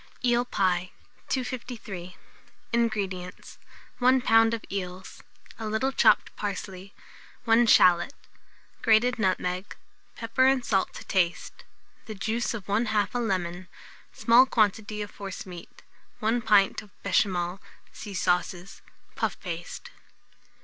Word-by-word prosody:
EEL 240 0 +3
PIE. 185 -5 0 0.4
253. 230 -8 -5 0.6
INGREDIENTS. 200 -6 -2 0.4
1 255 +1 +4
lb. 225 -1 +5
of 225 - -9
eels, 185 -1 -6 0.4
a 220 - -4
little 220 +5 0
chopped - - +3
parsley, 195 -1 -5 0.5
1 230 0 +4
shalot; 180 +4 +5 0.7
grated 230 +2 +3
nutmeg; 185 -1 -1 0.4
pepper 230 +3 +1
and 265 -2 +2
salt 195 -3 +1
to - - -8
taste; 180 -2 -1 0.4
the 215 - -6
juice 225 +4 -2
of 205 -5 -7
1/2 210 0 +1
a 245 - -1
lemon, 185 -5 -2 0.4
small 245 +3 +5
quantity 210 -2 0
of 205 - -10
forcemeat, 185 -3 -9 0.4
1/4 230 +2 0
pint 205 -2 +4
of 210 - -16 0.2
béchamel 185 -2 +1 0.3
(see 205 -2 -8
Sauces); 180 +1 -1 0.3
puff - - -2
paste. 170 -2 -7
205 Hz, 115 wpm, -27 LUFS, 185-230 Hz, 0.7 s, lb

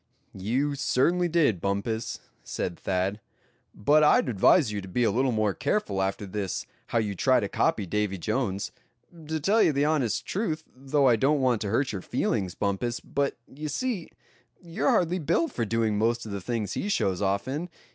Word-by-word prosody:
"You 125 +10 -1
certainly 150 +6 +2
did, 150 - +2
Bumpus," 100 +3 -2 0.2
said 85 - -4
Thad; 95 +2 -1 0.5
"but 150 +9 +4
I'd 150 - +4
advise 120 - +4
you 105 -1 -3
to 95 - -9
be 120 +7 0
a 115 - +3
little 130 +2 +1
more 110 -3 +1
careful 100 - -1
after 95 +1 -2
this 100 -1 -3 0.2
how - - -1
you 105 -3 0
try 130 +7 +3
to 100 - -2
copy 100 +1 0
Davy 105 +1 -1
Jones. 100 +1 -2 0.6
To 160 0 -1
tell 200 +9 +2
the 140 0 +1
honest 140 -9 0
truth, 165 -6 -2
though 135 +1 +1
I 120 -3 +5
don't 140 +5 +2
want 125 -4 +2
to 105 - -2
hurt 130 +6 +1
your 100 -3 -4
feelings, 90 -1 -1
Bumpus, 105 +4 -1
but, 140 0 -2
you 150 +3 -7
see, 215 - -2 0.5
you're 170 -1 -1
hardly 180 +1 +2
built 170 - +1
for 115 - -2
doing 110 -1 0
most 115 +2 +1
of 110 - -7
the 100 -1 -4
things 110 -2 -2
he 205 - -2
shows 95 - 0
off 100 +4 0
in. 150 +7 -3
120 Hz, 185 wpm, -27 LUFS, 100-145 Hz, 0.6 s, I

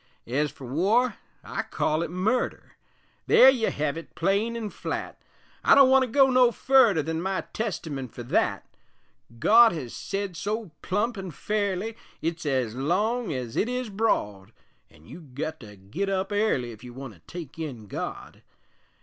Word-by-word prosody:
Ez 145 +5 0
fer 135 -1 -11
war, 200 - +1 0.3
I - - -3
call 155 +1 -1
it 170 - -2
murder 195 +9 -1 0.5
There 265 - +8
you 235 -4 0
hev 150 +1 -2
it 165 - -14
plain 200 +6 0
an' 215 -3 -4
flat; - - -5 0.4
I - - +7
don't 275 -2 +7
want 265 0 +6
to 260 - +1
go 270 +2 +4
no 250 -1 +5
furder 235 - +4
Than 160 +2 -2
my 190 +1 -1
Testament 150 - -4
fer 120 - -8
that; 120 - 0 0.7
God 225 - +6
hez 130 -8 -6
sed 195 -2 -4
so 210 +1 -3
plump 210 +3 -1
an' 190 -1 -5
fairly, 205 +5 -2 0.2
It's 165 0 -3
ez 130 -5 0
long 195 - 0
ez 125 -4 -4
it 230 - +1
is 250 -2 -3
broad, 105 - -1 0.4
An' 75 - -20
you've 145 - -13
gut 155 +3 -4
to 105 -3 -12
git 120 - -4
up 195 +1 -1
airly 205 - +1
Ef 110 +1 -13
you 120 -1 -10
want 135 -3 -8
to 90 - -20
take 165 -3 -8
in 130 -9 -6
God. 100 - -6
180 Hz, 170 wpm, -26 LUFS, 135-220 Hz, 0.7 s, There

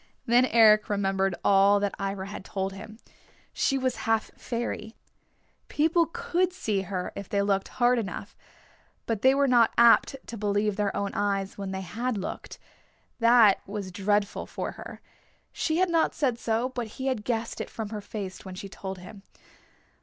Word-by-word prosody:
Then 240 +2 +5
Eric 215 -3 +5
remembered 195 -2 0
all 200 +1 +5
that 200 -1 -1
Ivra 195 -1 -3
had 200 -1 -8
told 195 0 -3
him. 215 +2 -10 0.6
She 275 - +1
was 260 -1 -1
half 225 -1 +1
fairy. 235 -1 -4 0.7
People 325 +2 +2
could 370 -3 -1
see 215 - -1
her 185 -1 -4
if 200 - -7
they 200 -1 +1
looked 195 -1 0
hard 245 0 +2
enough. 200 0 -6 0.7
But 225 -3 -2
they 260 +1 +5
were 280 0 +3
not 240 -3 +4
apt 235 +3 +6
to 230 - -7
believe 205 0 0
their 205 -1 -1
own 200 -1 -2
eyes 200 -1 -1
when 195 -1 -4
they 190 0 -4
had 230 +5 -3
looked. 190 - -6 0.6
That 230 -4 +6
was 200 -2 -5
dreadful 205 +1 0
for - - -4
her. - - -10 0.5
She 315 -1 -1
had 370 -1 +2
not 330 -1 +2
said 255 -6 0
so, 230 +2 0
but 245 -3 -4
he 260 - -4
had 255 -6 -1
guessed 230 0 -2
it - - -6
from 220 -2 -6
her 210 -1 -5
face 200 -2 -7
when 190 -1 -8
she 195 - -7
told 190 0 -7
him. 185 +3 -12
210 Hz, 175 wpm, -27 LUFS, 195-240 Hz, 0.7 s, apt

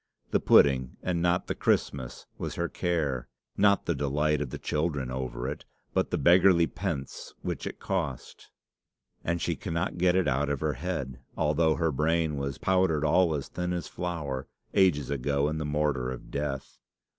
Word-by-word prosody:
the - - +3
pudding 65 -3 +4
and 90 -2 0
not 90 +1 +2
the - - -2
Christmas 65 -3 -1
was - - -4
her - - -1
care; 75 -8 -1 0.3
not 100 0 +4
the 85 - +1
delight 75 +1 +1
of 70 - -2
the - - -5
children 75 -5 -1
over 65 -1 -3
it, 70 +2 -5 0.3
but - - +1
the - - 0
beggarly 90 -1 +6
pence 80 -7 -5
which - - -3
it - - -6
cost. - - -4 0.7
And 85 +1 0
she - - -1
cannot 85 +2 -3
get 90 0 +4
it 95 -4 +2
out 70 +1 +1
of 70 -2 -1
her 75 0 0
head, 65 -4 -4 0.2
although 80 +1 +2
her 80 -2 +1
brain 80 +2 +1
was 70 0 -3
'powdered 90 -5 +2
all 80 +1 +4
as 70 - -4
thin 90 0 -3
as 85 -3 -3
flour' 75 -7 -4 0.3
ages 75 -9 +3
ago 70 +1 +1
in 80 +1 -2
the 75 - -2
mortar 75 -4 0
of 65 - -8
Death. 70 -2 -4
75 Hz, 175 wpm, -28 LUFS, 70-85 Hz, 0.7 s, beggarly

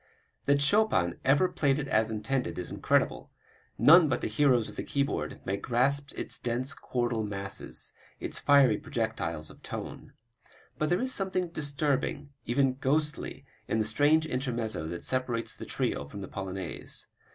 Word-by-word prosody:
That 140 0 +3
Chopin 145 - +3
ever 140 +7 +4
played 140 -5 +1
it 145 -2 -3
as 110 -3 +2
intended 125 +4 -2
is 90 - -5
incredible; - - +1 0.5
none 165 0 +7
but 130 - 0
the - - -1
heroes 120 0 +3
of - - -10
the - - -3
keyboard 140 0 -2
may 100 +1 -1
grasp 135 +6 +1
its - - -4
dense 125 +2 -2
chordal 120 -3 -1
masses, 100 -2 -5 0.3
its - - -4
fiery 135 -7 +5
projectiles 85 -9 -3
of - - -17
tone. - - -7 0.7
But 155 - +1
there 175 - +2
is 260 0 +1
something 185 -2 0
disturbing, 145 -1 0 0.2
even 130 +2 +2
ghostly, 150 +2 -1 0.2
in - - 0
the 110 - +1
strange 145 +8 +3
intermezzo 120 - -2
that 85 +1 -6
separates 125 -3 -1
the - - -8
trio 70 - -1
from 100 +8 -8
the 95 - -6
polonaise. 95 -2 -5
130 Hz, 155 wpm, -29 LUFS, 110-145 Hz, 0.7 s, none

